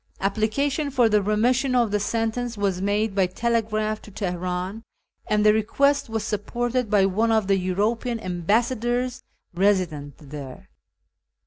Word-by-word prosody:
Application 260 +9 0
for 255 -4 +3
the 210 -1 +3
remission 245 +6 +1
of 235 -4 +2
the 210 - +1
sentence 230 +2 -2
was 195 -3 -1
made 205 +1 0
by 195 -2 +2
telegraph 215 +1 -1
to - - -13
Teheran, 185 +1 -3 0.5
and 210 0 +2
the 210 - +7
request 280 +6 +1
was 225 -1 -2
supported 235 +3 -2
by 200 -2 +4
one 215 +4 +1
of 220 -2 +2
the 195 0 +3
European 220 +6 -1
Ambassadors 240 +7 0 0.3
resident 175 -7 0
there. 140 -3 -10
215 Hz, 135 wpm, -24 LUFS, 195-235 Hz, 0.5 s, the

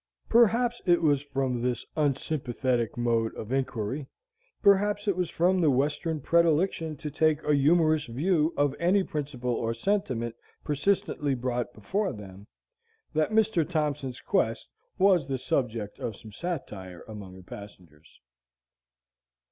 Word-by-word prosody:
Perhaps 235 +1 +4
it 175 -1 +4
was 145 -3 +3
from 135 -4 -2
this 125 0 -1
unsympathetic 130 -5 -1
mode 115 -2 +1
of 110 - -7
inquiry, 130 0 -2 0.6
perhaps 205 +1 +3
it 200 - +2
was 180 -2 -1
from 180 +2 +2
that 160 - +4
Western 150 +4 0
predilection 165 0 +2
to 150 +2 -6
take 155 0 +2
a 150 - +2
humorous 155 +1 +3
view 155 +6 +1
of 145 -1 +2
any 185 +3 +3
principle 135 -7 -3
or 115 0 -1
sentiment 120 - -1 0.3
persistently 150 -2 0
brought 125 -1 -2
before 190 - -2
them, 100 -2 -11 0.7
that 155 0 +2
Mr. 220 -5 +3
Thompson's 150 -6 -2
quest - - 0 0.3
was 185 -7 +4
the 135 -1 -1
subject 120 -5 -2
of 110 - -4
some 110 - -12
satire 100 - -6
among 100 -4 -9
the 95 - -13
passengers. 90 -6 -13
145 Hz, 130 wpm, -28 LUFS, 120-170 Hz, 0.7 s, Perhaps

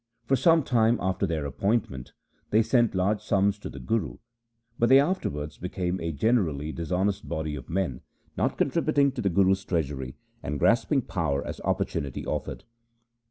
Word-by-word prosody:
1 - - -40
For 135 - +5
some 165 +4 +4
time 115 -2 +3
after 95 +1 0
their 80 -4 -2
appointment 70 - -2 0.4
they 110 +2 +4
sent 120 -2 +2
large 100 +3 +1
sums 100 0 +1
to - - -7
the 70 - -9
Guru, 105 - -2 0.6
but 120 - +3
they 135 +1 +8
afterwards 75 - -2
became 90 0 -3
a 85 0 -2
generally 80 - 0
dishonest 95 +5 -2
body 80 -2 -3
of 70 -4 -9
men, 85 -8 -2 0.3
not - - 0
contributing 145 -1 +2
to 130 -2 -5
the 100 - +1
Guru's 95 +1 +3
treasury, 70 -8 -3 0.3
and 75 +1 -3
grasping 115 - +2
power 80 -9 -2
as - - -6
opportunity 70 -3 -2
offered. - - -4
95 Hz, 160 wpm, -27 LUFS, 75-115 Hz, 0.6 s, they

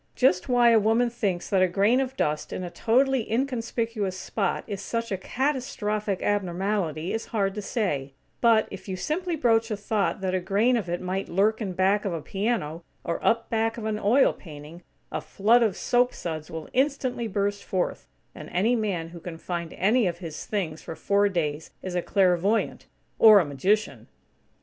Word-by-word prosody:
Just 250 -5 +2
why 240 -1 +5
a 225 - +6
woman 225 +3 +2
thinks 200 -7 -2
that 190 -2 +3
a 185 - +5
grain 200 +7 +3
of 265 0 -3
dust 150 0 -1
in 185 - -4
a 175 - -6
totally 255 +1 +1
inconspicuous 230 -5 -1
spot 195 0 -2
is 200 -3 -5
such 230 +1 -3
a - - +1
catastrophic 215 -5 -2
abnormality 185 -4 -1
is 225 - -3
hard 195 -3 0
to 210 - -4
say; 150 - -2 0.3
but 230 -2 +4
if 195 - -9
you 190 - -3
simply 335 - -2
broach 230 -5 +2
a 215 - -2
thought 205 0 -1
that 185 -1 -1
a 185 - +2
grain 205 +7 +2
of 210 -7 -2
it 175 0 -2
might 185 +1 -3
lurk 210 +5 +2
in 195 -4 -3
back 190 +3 +2
of 195 -4 -2
a 165 - -3
piano, 195 -6 -2 0.2
or 170 - -3
up 230 0 +1
back 225 0 0
of 225 - -5
an 215 -1 -1
oil 230 +7 +4
painting, 155 0 -11 0.3
a - - -3
flood 225 +5 +3
of 215 -5 +1
soap 245 0 +2
suds 155 -3 -5
will 160 -1 -6
instantly 260 -3 0
burst 200 0 -1
forth; 185 -2 -2 0.3
and - - -10
any 215 +7 +2
man 190 -8 -2
who 170 0 -10
can 165 0 -7
find 170 -1 -4
any 220 +3 +2
of 170 -1 -2
his 165 -3 -7
things 170 -7 -3
for 165 - -7
four 200 +3 +2
days 155 -4 -2
is 185 - -4
a 180 - 0
clairvoyant, 190 +3 +1 0.3
or 215 -2 +9
a 175 - +1
magician! 190 +10 0
205 Hz, 190 wpm, -26 LUFS, 180-230 Hz, 0.3 s, or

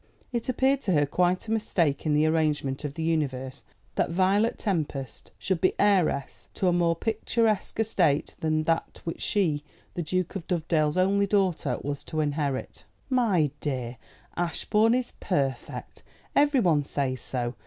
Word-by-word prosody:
It 235 +1 -2
appeared 265 +2 +2
to 190 - 0
her 145 -2 +4
quite 180 +7 +1
a - - -3
mistake 170 -10 0
in 150 - +3
the 150 +1 +4
arrangement 155 -4 0
of 145 -1 -4
the 160 - -3
universe 135 -5 -1 0.3
that - - 0
Violet 195 +6 +2
Tempest 150 - -3
should 185 -4 -1
be 185 - +3
heiress 185 -9 +1
to 190 - 0
a 180 - +4
more 170 -1 +2
picturesque 220 +2 0
estate 180 -10 +1
than 155 -1 +1
that 165 +1 -1
which 165 - -5
she, 160 -8 +1 0.3
the 175 - -3
Duke 185 +3 -2
of 180 -4 -5
Dovedale's 160 -2 +1
only 200 +2 +3
daughter, 185 -9 +1
was 145 0 -3
to 155 - -3
inherit. 145 -3 -2 0.3
"My 200 - +3
dear, 130 -5 -3 0.4
Ashbourne 210 +6 +2
is 255 -1 -2
perfect. 140 -8 -3 0.3
Everyone 245 - +4
says 135 -3 -2
so. 120 -2 -2
165 Hz, 155 wpm, -27 LUFS, 145-200 Hz, 0.4 s, her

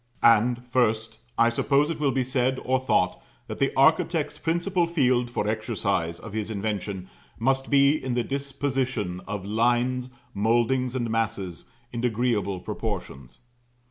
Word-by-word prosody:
And, 120 +2 +4
first, 115 -3 0 0.2
I 115 0 +5
suppose 140 +5 +2
it 160 - -5
will 145 -2 +2
be 135 -1 +1
said, 130 0 0
or 130 0 +2
thought, 90 -8 +1 0.2
that - - -7
the 135 - +2
architect's 150 +1 +3
principal 170 +2 0
field 130 -7 +2
for 110 -3 -2
exercise 95 -6 -1
of 115 - -10
his 110 -1 -3
invention 100 -3 -3 0.3
must 135 +3 0
be 140 +1 +4
in 130 -2 -2
the 120 - +1
disposition 130 -8 -2
of 105 -1 -4
lines, 120 +4 +1 0.2
mouldings, 120 +4 +1
and 120 -2 -1
masses, 105 -6 -2 0.3
in 120 0 -3
agreeable 110 -5 0
proportions. 65 -7 -5
120 Hz, 140 wpm, -26 LUFS, 110-135 Hz, 0.3 s, I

